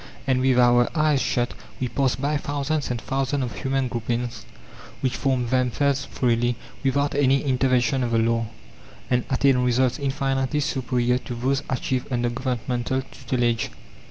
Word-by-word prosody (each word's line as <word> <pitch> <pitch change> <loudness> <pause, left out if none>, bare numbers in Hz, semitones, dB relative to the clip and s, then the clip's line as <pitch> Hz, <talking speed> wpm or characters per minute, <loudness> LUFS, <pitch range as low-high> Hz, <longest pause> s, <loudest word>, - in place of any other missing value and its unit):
And 130 -1 +2
with 130 -1 +3
our 120 0 +5
eyes 150 -3 +3
shut 120 0 0 0.3
we 130 - 0
pass 135 0 +1
by 145 +3 0
thousands 145 +1 -2
and 120 -1 -2
thousands 135 +2 -1
of 120 -4 -4
human 135 -1 0
groupings 120 -1 -3 0.5
which 130 -1 0
form 130 -3 0
themselves 130 +3 +1
freely, 120 -1 +1 0.3
without 140 +1 +1
any 135 -1 +3
intervention 130 -1 +2
of 120 - 0
the 115 - +2
law, 115 0 +1 0.6
and 125 -1 +2
attain 135 -1 +3
results 125 +2 +2
infinitely 135 +1 0
superior 125 -4 0
to 125 - -6
those 135 +4 0
achieved 130 0 -1
under 120 -1 +1
governmental 125 0 -2
tutelage. 120 -3 -1
130 Hz, 150 wpm, -24 LUFS, 120-135 Hz, 0.6 s, our